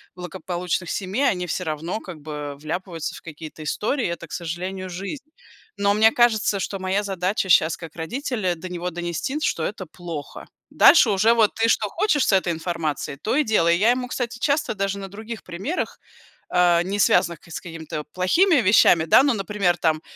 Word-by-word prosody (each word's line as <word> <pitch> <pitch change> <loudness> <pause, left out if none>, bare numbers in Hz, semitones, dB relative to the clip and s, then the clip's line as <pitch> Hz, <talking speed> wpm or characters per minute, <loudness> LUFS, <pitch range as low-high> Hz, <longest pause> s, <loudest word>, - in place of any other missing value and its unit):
благополучных 180 -1 -4
семей 200 +8 -2
они 180 -2 -2
всё 180 - -2
равно 165 +5 -3
как 180 -4 -9
бы 150 -1 -6
вляпываются 165 +1 -4
в - - -11
какие-то 155 -1 -9
истории. 225 - -1
Это, 170 0 -5
к - - -22
сожалению, 185 +3 -4
жизнь. 195 - -6 0.5
Но 200 0 +2
мне 220 +2 +5
кажется, 220 -4 +2
что 195 +1 -3
моя 190 +2 0
задача 190 0 -1
щас 160 -2 +4
как 165 -3 -10
родителя 215 - -2
до 170 +2 -8
него 180 0 -3
донести, 175 - -3
что 165 - 0
это 190 +1 -4
плохо. 165 -3 -8 0.2
Дальше 260 -9 +6
уже 210 +4 +4
вот 220 -3 +3
ты 225 0 +2
что 210 - +2
хочешь 330 - +1
с - - +3
этой 185 -2 +2
информацией, 160 -4 -3
то 215 - -2
и 300 - +3
делай. 170 - +3
Я 215 +6 +4
ему, 250 0 -1
кстати, 245 -1 -4
часто 285 0 +1
даже 195 0 -2
на 195 - -6
других 220 +2 -8
примерах, 195 - -4 0.5
а, 175 -1 +4
не 200 +3 -3
связанных 170 -4 +3
к 170 - -19
с - - -4
какими-то 160 -3 -6
плохими 330 - +3
вещами, 185 -5 +5
да, 210 +11 +6
ну 280 -3 +3
например, 195 -4 0
там, 155 -2 +1
185 Hz, 185 wpm, -23 LUFS, 170-215 Hz, 0.5 s, Дальше